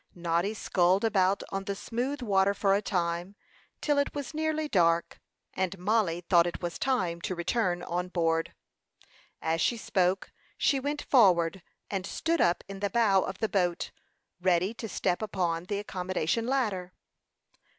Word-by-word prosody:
Noddy 175 Hz, +4 st, 0 dB
sculled 185 Hz, -1 st, +2 dB
about 200 Hz, -3 st, +2 dB
on 195 Hz, 0 st, -3 dB
the 200 Hz, -, -2 dB
smooth 250 Hz, +7 st, -3 dB
water 200 Hz, -2 st, +2 dB
for 195 Hz, -1 st, +2 dB
a 200 Hz, -, +2 dB
time, 175 Hz, 0 st, -2 dB, 0.5 s
till 290 Hz, -2 st, +2 dB
it 285 Hz, -, -1 dB
was 285 Hz, 0 st, -5 dB
nearly 310 Hz, 0 st, -1 dB
dark, 170 Hz, -7 st, +2 dB, 0.3 s
and 190 Hz, 0 st, -2 dB
Mollie 185 Hz, -3 st, +1 dB
thought 170 Hz, -1 st, +4 dB
it 175 Hz, -, -4 dB
was 175 Hz, -2 st, -4 dB
time 180 Hz, -11 st, 0 dB
to 185 Hz, -, -3 dB
return 175 Hz, 0 st, 0 dB
on 180 Hz, +1 st, -2 dB
board. 165 Hz, -2 st, 0 dB, 0.9 s
As 165 Hz, 0 st, 0 dB
she 240 Hz, -, +2 dB
spoke, 185 Hz, -3 st, 0 dB, 0.3 s
she 275 Hz, -, +2 dB
went 290 Hz, +2 st, -3 dB
forward 185 Hz, -, +4 dB, 0.3 s
and 195 Hz, -1 st, -2 dB
stood 330 Hz, +1 st, 0 dB
up 175 Hz, 0 st, +2 dB
in 195 Hz, 0 st, -7 dB
the 200 Hz, 0 st, -1 dB
bow 200 Hz, -3 st, +3 dB
of 190 Hz, 0 st, -4 dB
the 220 Hz, -, 0 dB
boat, 180 Hz, -3 st, 0 dB, 0.5 s
ready 185 Hz, +3 st, +2 dB
to 225 Hz, -1 st, -7 dB
step 180 Hz, -1 st, -1 dB
upon 180 Hz, -5 st, -1 dB
the 200 Hz, +2 st, -2 dB
accommodation 190 Hz, +2 st, -2 dB
ladder. 205 Hz, -9 st, -1 dB
190 Hz, 160 wpm, -29 LUFS, 175-225 Hz, 0.9 s, thought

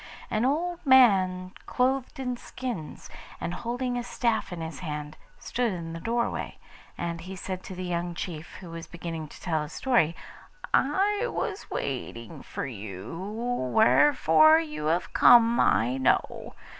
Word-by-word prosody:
An 215 Hz, +3 st, +1 dB
old 340 Hz, +6 st, -1 dB
man 190 Hz, -, +5 dB, 0.2 s
clothed 260 Hz, +1 st, 0 dB
in 250 Hz, -2 st, -2 dB
skins, 240 Hz, -9 st, -6 dB, 0.3 s
and 170 Hz, -, -3 dB
holding 245 Hz, +4 st, -2 dB
a -, -, -4 dB
staff 235 Hz, -3 st, -1 dB
in 175 Hz, -, -5 dB
his 160 Hz, -2 st, -6 dB
hand, 150 Hz, -3 st, -5 dB, 0.2 s
stood 245 Hz, -2 st, -1 dB
in 165 Hz, -2 st, -6 dB
the 165 Hz, -, -6 dB
doorway; 235 Hz, +5 st, -2 dB, 0.4 s
and 170 Hz, -1 st, -3 dB
he 185 Hz, +3 st, -8 dB
said 185 Hz, 0 st, -5 dB
to 190 Hz, -, -7 dB
the 185 Hz, -, -5 dB
young 175 Hz, 0 st, -2 dB
chief 160 Hz, -3 st, -6 dB
who 175 Hz, -3 st, -9 dB
was 165 Hz, 0 st, -7 dB
beginning 165 Hz, -2 st, -6 dB
to -, -, -14 dB
tell 160 Hz, -4 st, -1 dB
his 150 Hz, +1 st, -7 dB
story, 230 Hz, -12 st, +2 dB, 0.6 s
'I 405 Hz, -, +2 dB
was 410 Hz, -3 st, -4 dB
waiting 115 Hz, -4 st, -5 dB
for -, -, -5 dB
you, 105 Hz, -, -7 dB, 0.6 s
wherefore 160 Hz, -, +6 dB
you 150 Hz, -2 st, -5 dB
have 170 Hz, +3 st, 0 dB
come 235 Hz, 0 st, +6 dB
I 120 Hz, +4 st, +3 dB
know. 130 Hz, -, 0 dB
180 Hz, 150 wpm, -27 LUFS, 160-245 Hz, 0.6 s, wherefore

